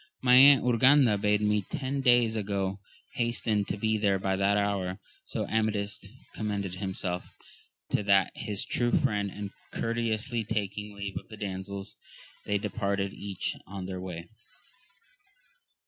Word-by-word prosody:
My 125 -1 +5
Aunt 135 +2 +8
Urganda 125 0 +5
bade 105 0 +2
me 105 0 +2
ten 135 +1 -2
days 120 -3 +4
ago 100 -2 -2 0.4
hasten 115 -3 0
to 100 - -3
be 110 +1 0
there 100 -2 +2
by 95 0 0
that 100 +1 +2
hour. 100 -2 -1 0.3
So - - -3
Amadis 110 -2 0 0.3
commended 100 -4 -3
himself 95 -2 -3 0.6
to - - +2
that 100 -1 +3
his 105 -2 -2
true 120 -1 0
friend, 105 -1 +1
and 100 0 -6 0.2
courteously 115 0 -1
taking 105 -1 -3
leave 100 -1 -5
of - - -19
the 110 - -11
damsels, 100 -1 -5 0.5
they 105 - +2
de 100 - -4
parted 100 -2 -1
each 100 -2 -4
on 95 -1 -6
their 95 -1 -5
way. 85 -2 -6
105 Hz, 145 wpm, -29 LUFS, 100-110 Hz, 0.6 s, Aunt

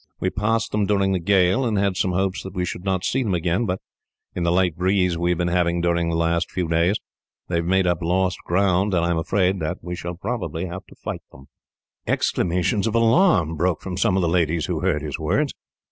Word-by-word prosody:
We - - 0
passed 115 +4 0
them 105 -2 0
during 100 -2 +2
the 95 - +1
gale, 95 +6 +3
and 110 -4 0
had 100 -1 +1
some 90 0 0
hopes 95 +1 0
that 95 0 -9
we 90 -1 0
should 90 - -5
not 95 -2 -1
see 135 - +1
them 105 -7 0
again; 90 +6 0
but, 90 0 -2 0.5
in 90 - -4
the 85 0 +2
light 90 -2 +2
breeze 90 0 +1
we 85 +1 -1
have 90 - +1
been 90 0 0
having 85 0 +1
during 85 0 +1
the 85 - -1
last 85 +1 +1
few 90 -2 -2
days, 85 +4 +2 0.5
they 85 - 0
have 85 - -1
made 95 +1 +2
up 90 -1 0
lost 90 +1 0
ground, 95 +1 +1
and 85 -1 +2
I 85 - +1
am 85 - +1
afraid 95 +3 +1 0.3
we 90 0 -4
shall 85 0 -6
have 120 -2 -1
to 85 +3 -6
fight - - -4
them." 65 0 -16 0.6
Exclamations 90 +5 0
of 115 - -1
alarm 115 - +3
broke 85 +2 0
from 95 -2 -5
some 95 +1 +2
of 95 - +1
the - - +2
ladies 85 -1 +1
who 85 -3 -2
heard 85 -5 0
his 75 -3 -4
words. - - 0
90 Hz, 225 wpm, -23 LUFS, 85-95 Hz, 0.6 s, gale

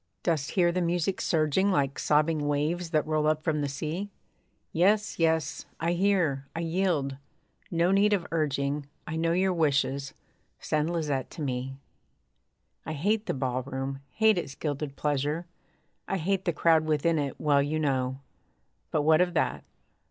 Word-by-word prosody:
Dost 155 -5 0
hear 175 -3 +3
the 180 +1 -1
music 175 +2 0
surging 160 +4 +2
Like 140 -7 +1
sobbing 150 0 +2
waves 155 +4 0
that 155 -2 +1
roll 155 -1 +1
up 155 0 +1
from 155 -3 0
the 145 - -1
sea? 155 +8 -4 0.6
Yes, 205 +5 +2
yes, 160 -2 +1
I 165 +1 0
hear 175 -7 +1
I 165 - -2
yield 165 -6 0 0.5
no 170 +1 +2
need 200 +2 +4
of 195 -5 +1
urging; 145 -2 -1 0.2
I 160 - -4
know 165 +1 +1
your 185 +1 +2
wishes, 140 -4 0 0.4
send 155 +1 0
Lisette 150 -6 -1
to 160 - -7
me. 130 0 -3 1.1
I 160 - -4
hate 205 +8 0
the - - -1
ballroom; 135 +1 -3
hate 220 - +3
its 135 -5 -6
gilded 145 -1 -3
pleasure; 150 +3 -1 0.6
I 195 - -1
hate 190 +2 -1
the 175 - +2
crowd 160 0 +3
within 155 +1 +1
it, 140 -2 -3
well 145 -2 +3
you 145 +2 -1
know; 135 -3 -1 0.7
But 150 - 0
what 155 +2 +5
of 180 -1 +1
that? - - 0
155 Hz, 160 wpm, -28 LUFS, 140-175 Hz, 1.1 s, what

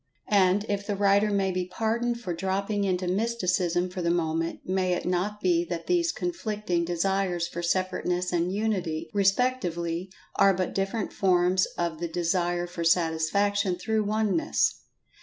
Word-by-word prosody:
And, 200 0 +3
if 200 0 -2
the 205 - -1
writer 200 +1 +3
may 195 -2 +1
be 180 -1 -2
pardoned 230 +5 -1
for 190 -7 -4
dropping 195 +3 -1
into 185 -1 0
Mysticism 180 -4 0
for 180 0 -4
the 170 - 0
moment, 165 -1 -1
may 185 -1 0
it 175 - -3
not 185 +4 -1
be 175 -3 +2
that 170 -1 -5
these 345 -2 +2
conflicting 210 - -2
Desires 175 0 0
for 170 0 -5
Separateness 180 0 -1
and 175 +1 +1
Unity, 180 -6 -2
respectively, 190 -5 0 0.3
are 195 -1 +5
but 185 -1 -2
different 195 +2 -2
forms 180 -1 +3
of 170 -2 -2
the 170 - -2
Desire 175 +1 0
for 175 -1 -5
Satisfaction 180 +4 +2
through 215 +3 0
Oneness. 215 +9 +1
185 Hz, 150 wpm, -27 LUFS, 175-205 Hz, 0.3 s, are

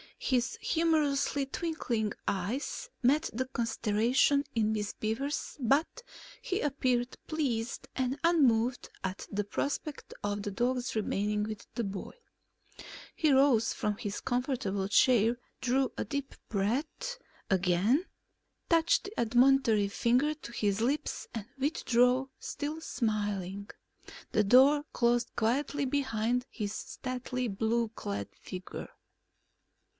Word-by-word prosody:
His 250 -1 0
humorously 300 -4 +2
twinkling 245 - -2
eyes 230 - -2
met 295 +6 +3
the 255 +4 -1
consternation 235 +3 +2
in 220 -1 +2
Miss 210 -1 -2
Beaver's 270 +7 -3
but 275 - +1 0.4
he 380 0 -1
appeared 255 -4 0
pleased 245 -7 -2
and 260 +2 -1
unmoved 255 -8 +3
at 190 0 -4
the 205 +1 0
prospect 280 +7 -3
of 205 0 -1
the 205 - -3
dog's 245 +4 -1
remaining 210 0 0
with 215 -1 -6
the 235 - -1
boy. 195 -2 -5 1.0
He 310 -3 +3
rose 265 -4 +4
from 210 -4 -1
his 205 -2 -4
comfortable 245 -7 -1
chair, 230 +2 +4 0.2
drew 260 +1 +1
a - - -1
deep 280 +5 -4
breath, 255 - -1 0.3
again 190 - +3 0.6
touched 335 +2 +3
the 405 +2 -6
admonitory 240 -3 +4
finger 245 +8 +2
to 305 -6 -10
his 205 -2 0
lips 275 +6 -1
and 225 -4 -4
withdrew, 260 -2 +2
still 300 +2 -4
smiling. 205 - -2 0.6
The 215 - +3
door 270 +7 +6
closed 240 0 +2
quietly 275 +5 0
behind 250 -3 0
his 205 -3 -4
stately 255 +1 -4
blue 225 +2 0
clad 100 - -5
figure. 185 0 -7
245 Hz, 115 wpm, -31 LUFS, 215-275 Hz, 1.0 s, door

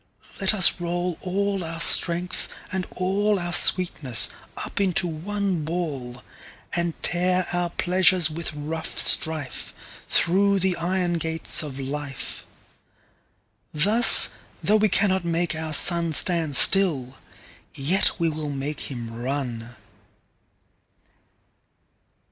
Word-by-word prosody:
Let 195 +1 +1
us 185 -3 +4
roll 175 0 -4
all 195 +1 -3
our 165 0 -7
Strength, 175 +1 +3 0.2
and 185 -1 -5
allOur 190 -1 -2
sweetness, 160 - +2 0.3
up - - -6
into 185 -2 -1
one 185 +1 -5
Ball:And 155 +1 -7
tear 180 +1 -1
our 175 0 -2
Pleasures 180 -1 +1
with 165 +1 -5
rough 155 +2 -7
strife, 155 -5 0 0.3
Thorough 200 +3 +1
the 190 -1 -1
Iron 175 0 -3
gates 160 0 -1
of 140 -3 -8
Life.Thus, 135 - +1 0.3
though 215 - +2
we 215 0 0
cannot 190 -1 0
make 170 0 -2
our 160 0 -6
SunStand 165 -1 +2
still, 150 -11 +5 0.6
yet 175 +9 0
we 170 - -1
will 155 -1 -5
make 145 +2 -6
him 120 -4 -8
run. 120 -1 -6
170 Hz, 100 wpm, -22 LUFS, 150-185 Hz, 0.6 s, still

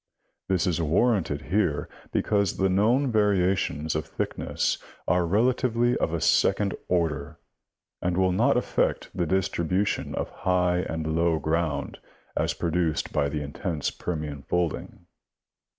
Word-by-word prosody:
This 95 -3 +1
is 85 -2 0
warranted 80 -3 +1
here 85 -9 +1 0.2
because 100 -2 +1
the 95 0 +2
known 120 +8 +3
variations 95 -7 +1
of 75 - -2
thickness - - -2 0.3
are 90 -1 +2
relatively 120 +4 +2
of - - 0
a 85 - -1
second 100 +4 +2
order, 80 -3 -1 0.6
and 90 0 0
will 95 -1 +3
not 90 - +3
affect - - 0
the 90 -2 0
distribution 95 +1 0
of - - -3
high 90 -1 +1
and 80 -2 -2
low 85 0 +2
ground 80 -2 -1 0.4
as - - 0
produced 85 -1 -1
by 70 - +1
the 75 +1 -3
intense 75 +2 -3
Permian 75 -5 -4
folding. 90 +2 -2
90 Hz, 130 wpm, -26 LUFS, 80-95 Hz, 0.6 s, known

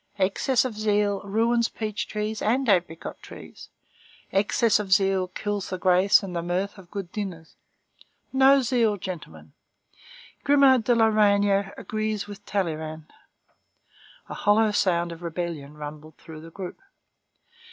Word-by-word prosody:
Excess 220 +7 +1
of 255 - -3
zeal 210 -1 +1
ruins 230 +3 +1
peach 215 -1 -4
trees 210 0 -4
and 250 +5 +1
apricot 175 -5 0
trees. - - -12 0.6
Excess 210 +3 +2
of 200 -2 -5
zeal 190 -1 +3
kills 205 +2 -4
the 185 - -3
grace 185 +3 +4
and 185 -2 -6
the 170 - -1
mirth 185 +4 -3
of 180 -2 -15
good 195 -3 -6
dinners. 180 -6 -6 0.8
No 270 0 +5
zeal, 230 -4 +1
gentlemen! 80 - -8 0.9
Grimod 275 -5 +5
de 240 - +3
la 225 -1 +4
Reynière 200 -2 +2
agrees 215 -1 -3
with 205 0 -11
Talleyrand." 160 -5 -3 1.1
A - - -7
hollow 215 +1 +3
sound 175 -4 +1
of 165 0 -9
rebellion 165 -4 -5
rumbled 150 +1 -9
through 160 -1 -11
the 165 - -11
group. 180 +1 -8
200 Hz, 135 wpm, -25 LUFS, 175-215 Hz, 1.1 s, No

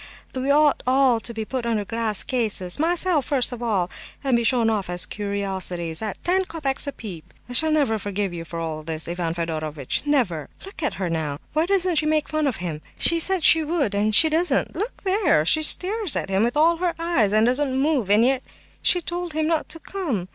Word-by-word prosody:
we 260 +1 -3
ought 295 0 +3
all 260 -2 +3
to 235 - -3
be 220 -1 -5
put 255 +2 -4
under 225 -3 -1
glass 225 -1 -1
cases—myself 280 - +1
first 260 -1 0
of 245 -1 -7
all—and 225 +4 -2
be 235 - +1
shown 230 0 +2
off 210 -5 -1
as 175 0 +2
curiosities, 190 -5 -3
at 215 -3 -4
ten 370 +2 +2
copecks 300 -6 -2
a - - -1
peep!" 190 - -10 0.2
"I 245 - -8
shall 315 +5 +4
never 285 -8 +1
forgive 200 -2 -3
you 170 -1 -6
for 165 +1 -7
all 160 -2 -4
this, 160 0 -4
Ivan 170 -1 -3
Fedorovitch—never! 165 - -2 0.2
Look 390 -4 -9
at 300 - -1
her 190 - -3
now. 160 -4 -3 0.2
Why 315 +3 +1
doesn't 370 -3 +1
she 305 - +2
make 310 -1 0
fun 310 -1 0
of 260 - -1
him? 165 -4 -5 0.2
She 335 - +2
said 375 0 +2
she 320 0 +6
would, 300 - -1
and 210 +1 +1
she 320 - +8
doesn't. 325 +3 0
Look 440 +5 -5
there! 375 - +2
She 315 - +3
stares 380 +3 +4
at - - -3
him 190 +1 +2
with 240 +5 0
all 330 +2 +4
her 350 0 -1
eyes, 330 - +1
and 215 +1 +3
doesn't 260 +1 +1
move; 275 -8 0
and 210 +3 +5
yet 260 0 +1 0.4
she 355 - +2
told 345 0 -4
him 310 0 0
not 320 -1 -1
to 325 - -1
come. 285 - -4
245 Hz, 210 wpm, -23 LUFS, 195-315 Hz, 0.4 s, she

